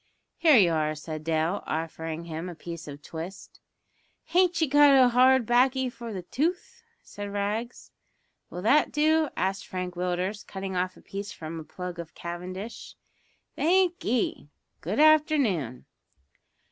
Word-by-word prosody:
"Here 310 -6 +6
you 180 -6 +5
are," 155 -1 0
said 155 0 -7
Dale, 165 +4 0
offering 160 0 -4
him 165 +2 -5
a 175 - -8
piece 170 0 -8
of 145 0 -9
twist. 170 +4 -8 0.7
"Han't 355 0 +3
ye 320 - +2
got 290 +1 +6
a - - +6
bit 260 -1 +7
o' - - +4
hard 255 +1 +5
baccy 255 +2 +3
for 235 -1 -8
the 190 -4 -5
tooth?" 360 - -2 0.2
said 205 0 -7
Rags. 210 +4 -3 0.6
"Will 180 - -7
that 285 +7 +4
do?" 310 0 +2
asked 195 +1 -1
Frank 180 -1 -4
Willders, 180 +3 -2
cutting 190 -1 -6
off 185 +1 -1
a - - -16
piece 200 +1 -6
from 160 +1 -7
a - - -7
plug 180 +2 -7
of 165 -2 -8
cavendish. 185 +5 -7 0.6
"Thank'ee. 335 - +1 0.3
Good 195 - -2
afternoon." 290 - +3
195 Hz, 150 wpm, -27 LUFS, 170-265 Hz, 0.7 s, bit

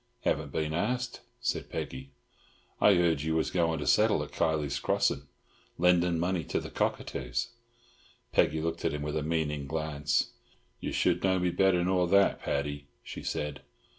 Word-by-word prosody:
"Haven't 75 -2 0
been 75 0 -1
asked," 125 +8 -1 0.2
said - - -2
Peggy. 65 +1 -5 0.7
"I 105 - +6
heard 85 -4 +2
you 80 +2 -1
was 80 - +1
goin' 85 -2 +1
to - - -4
settle - - +4
at - - -9
Kiley's 75 -3 0
Crossin', 70 0 0 0.5
lending 90 -1 +3
money 90 0 0
to - - -1
the - - -8
cockatoos." - - -2 0.8
Peggy 80 +2 +2
looked 85 0 -2
at 75 - 0
him 75 - -4
with 75 0 -3
a 80 - 0
meaning 75 -2 -1
glance. 75 -2 0 0.5
"Ye - - -4
should 90 0 +1
know 95 -1 +3
me 90 -1 +1
better 90 0 +3
nor 90 -1 +2
that, 100 +2 +4
Paddy," 70 0 -2 0.2
she - - -7
said. 75 -1 -3
80 Hz, 165 wpm, -30 LUFS, 75-90 Hz, 0.8 s, I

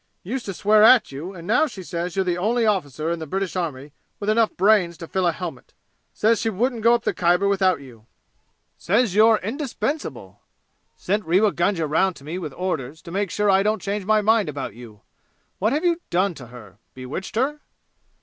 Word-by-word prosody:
Used 240 +6 -5
to 195 - -3
swear 210 +3 +4
at 230 - +6
you, 165 +8 -7
and 170 -2 -10
now 240 - +3
says 180 - -5
you're 190 -1 +1
the 175 -1 0
only 225 +6 +1
officer 160 - -1
in 170 - -2
the 160 - -6
British 190 +4 -3
army 150 -6 -4 0.3
with 210 +1 0
enough 225 0 +1
brains 185 -4 +3
to 165 - -8
fill 190 -1 0
a - - +3
helmet! 180 - -8 0.4
Says 225 +1 +1
she 225 - 0
wouldn't 230 +3 -1
go 230 +2 +5
up 235 - -3
the - - 0
Khyber 175 +3 +2
without 190 -5 +2
you! 115 -5 -15 0.7
Says 210 +2 +1
you're 220 +2 +5
indispensable! 275 +4 -4 0.6
Sent 205 +3 -1
Rewa 195 +5 +3
Gunga 175 -2 0
round 170 +5 +1
to 140 - -15
me 160 +5 -5
with 155 -5 -5
orders 160 -5 -4
to 170 - -10
make 200 +1 -1
sure 210 +3 +1
I 190 0 +4
don't 215 +2 0
change 205 0 -3
my 215 0 +3
mind 215 -4 +3
about 140 -7 -5
you! 110 -3 -13 0.6
What 215 +4 +1
have 305 +6 -1
you 345 0 +1
done 185 +2 +1
to 130 -6 -11
her 105 -5 -14 0.2
bewitched 130 +11 -7
her?" 275 +6 0
190 Hz, 200 wpm, -23 LUFS, 165-215 Hz, 0.7 s, at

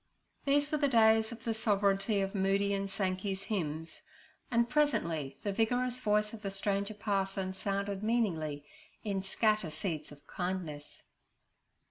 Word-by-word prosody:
These 285 +1 +3
were 305 - +1
the 285 - +3
days 220 -2 +5
of 230 -1 -9
the 230 - 0
sovereignty 200 -1 +2
of 195 0 -2
Moody 200 0 +2
and 195 0 -1
Sankey's 190 0 -2
hymns, 160 - -3 0.5
and 235 0 +3
presently 170 - +1
the 205 - 0
vigorous 245 +4 +1
voice 210 -2 +1
of 220 - -8
the 200 - -3
stranger 200 +1 -1
parson 195 -2 -1
sounded 200 +1 -2
meaningly 175 -11 0 0.4
in 200 -3 -1
'Scatter 210 -1 +1
Seeds 155 0 -4
of 145 0 -14
Kindness.' 180 -5 -4
200 Hz, 140 wpm, -32 LUFS, 190-220 Hz, 0.5 s, days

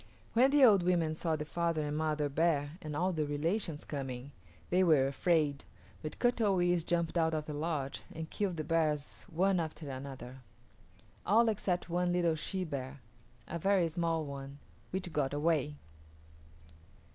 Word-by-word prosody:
When 250 +4 +5
the 280 -1 +6
old 205 -6 +6
women 175 -3 +2
saw 160 0 -1
the 150 0 -4
father 165 -1 -1
and 145 0 -2
mother 155 -1 0
bear 145 -1 +1
and 150 -1 -5
all 180 +4 +1
their 155 -2 0
relations 160 +2 -1
coming 135 -2 -5 0.4
they 185 +1 +4
were 155 -6 +5
afraid, 145 0 +1 0.4
but 155 - -6
Kut 245 -1 +2
o 205 -3 +3
yis´ 175 -1 +2
jumped 170 0 0
out 160 -1 +2
of 155 -1 -2
the 150 - -5
lodge 145 -3 -2
and 160 0 -6
killed 190 -1 -2
the 155 - -2
bears 155 -1 -1
one 185 +2 +2
after 160 -1 -4
another; 130 -1 -7 0.9
all 225 +3 +4
except 190 -4 -1
one 175 +1 0
little 175 -2 +2
she 185 +4 -3
bear, 140 -4 -5 0.5
a 170 - -4
very 190 -1 +3
small 165 -1 -1
one, 140 0 -7 0.3
which 185 -2 -4
got 145 -1 0
away. 150 -1 +1
160 Hz, 165 wpm, -33 LUFS, 145-175 Hz, 0.9 s, the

